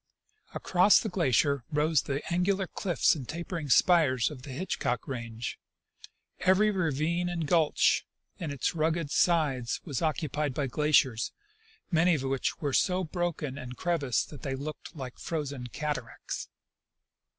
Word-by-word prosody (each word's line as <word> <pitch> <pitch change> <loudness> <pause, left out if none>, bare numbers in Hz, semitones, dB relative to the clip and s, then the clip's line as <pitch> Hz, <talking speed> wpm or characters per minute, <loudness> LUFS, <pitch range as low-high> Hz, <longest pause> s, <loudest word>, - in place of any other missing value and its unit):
Across 185 +3 +4
the 220 - -3
glacier 140 - +2
rose 150 +1 +2
the 140 +1 -3
angular 190 +2 +1
cliffs 175 -1 +1
and 135 -6 -6
tajjering 165 -3 -4
spires 155 -8 +4
of 135 -4 -9
the 140 - -10
Hitchcock 130 -4 -2
range. 115 -3 -5 0.8
Every 190 +3 +4
ravine 170 -1 0
and 170 -2 -2
gulch 160 -1 +3 0.4
in 165 - -3
its 140 +3 -1
rugged 160 -1 0
sides 145 -10 +2
was 145 -8 -3
occupied 150 -3 -1
by 145 - 0
glaciers, 130 -4 +2 0.6
many 170 +1 +4
of 140 - -3
which 135 -1 -1
were 145 -3 -2
so 185 +4 +2
broken 160 -5 -3
and 125 -1 -8
crevassed 145 -10 0
that 145 - -10
they 135 -2 -3
looked 150 +4 -7
like 130 -4 -7
frozen 140 -6 -4
cataracts. 150 +4 -4
150 Hz, 140 wpm, -29 LUFS, 135-170 Hz, 0.8 s, Across